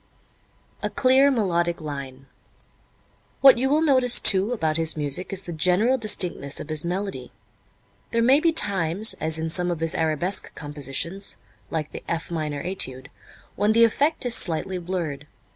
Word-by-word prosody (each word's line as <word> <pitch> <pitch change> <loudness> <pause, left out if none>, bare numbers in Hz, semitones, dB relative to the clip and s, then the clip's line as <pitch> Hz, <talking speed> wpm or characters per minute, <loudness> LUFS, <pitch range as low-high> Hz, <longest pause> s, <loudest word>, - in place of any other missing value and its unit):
A - - -2
Clear 270 +1 +4
Melodic 175 -9 0
Line. 140 -3 -7 1.2
What 270 -3 +7
you 265 +2 +1
will 305 +3 +2
notice, 255 -5 +4
too, 195 +3 +4
about 160 -9 -1
his 160 -1 -1
music 150 +6 -2
is 195 -1 -3
the 175 - -7
general 185 +11 +2
distinctness 180 -10 0
of 155 - -8
his 155 -1 -2
melody. 180 -7 -4 0.8
There 230 0 0
may 265 +4 +5
be 330 +1 +2
times, 200 - +2
as 160 0 -1
in 160 0 -3
some 180 +1 0
of 170 -2 -3
his 165 0 -1
arabesque 165 +4 -1
compositions, 150 +6 -4 0.3
like 155 -2 -4
the - - -8
"F 165 +1 -4
Minor 150 -3 -3
Étude," 130 -8 -2 0.5
when 210 +1 +2
the 230 +1 +5
effect 285 +6 +1
is 245 - 0
slightly 180 -1 -2
blurred. 165 -5 -5
175 Hz, 160 wpm, -24 LUFS, 155-225 Hz, 1.2 s, What